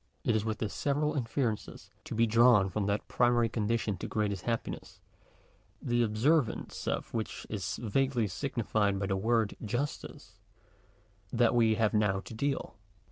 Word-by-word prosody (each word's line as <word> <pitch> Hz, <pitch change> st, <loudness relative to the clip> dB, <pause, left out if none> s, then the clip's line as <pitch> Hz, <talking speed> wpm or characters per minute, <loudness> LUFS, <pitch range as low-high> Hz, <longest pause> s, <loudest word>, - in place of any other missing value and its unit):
It 115 Hz, -, +2 dB
is 110 Hz, -, +1 dB
with 110 Hz, -1 st, -2 dB
the 110 Hz, -, -2 dB
several 145 Hz, +6 st, 0 dB
inferences 120 Hz, -4 st, -3 dB
to -, -, -5 dB
be 115 Hz, +1 st, +4 dB
drawn 115 Hz, -3 st, +5 dB
from 100 Hz, +1 st, -1 dB
that 100 Hz, +1 st, -1 dB
primary 120 Hz, -1 st, +3 dB
condition 110 Hz, -2 st, -1 dB
to -, -, -5 dB
greatest 100 Hz, -4 st, -2 dB
happiness, 115 Hz, -1 st, -4 dB, 0.8 s
the 120 Hz, 0 st, 0 dB
observ 120 Hz, +5 st, +3 dB
ance -, -, -7 dB
of -, -, -2 dB
which 110 Hz, -2 st, -4 dB
is 100 Hz, -3 st, -3 dB
vaguely 125 Hz, +1 st, 0 dB
signified 105 Hz, -3 st, -1 dB
by 100 Hz, -, -1 dB
the 95 Hz, 0 st, 0 dB
word 110 Hz, +1 st, +1 dB
justice, 120 Hz, +7 st, -4 dB, 0.9 s
that 120 Hz, 0 st, +3 dB
we 115 Hz, -2 st, +4 dB
have 110 Hz, 0 st, +1 dB
now 105 Hz, -3 st, +2 dB
to 95 Hz, -, -10 dB
deal. 135 Hz, 0 st, -2 dB
115 Hz, 155 wpm, -31 LUFS, 105-120 Hz, 0.9 s, drawn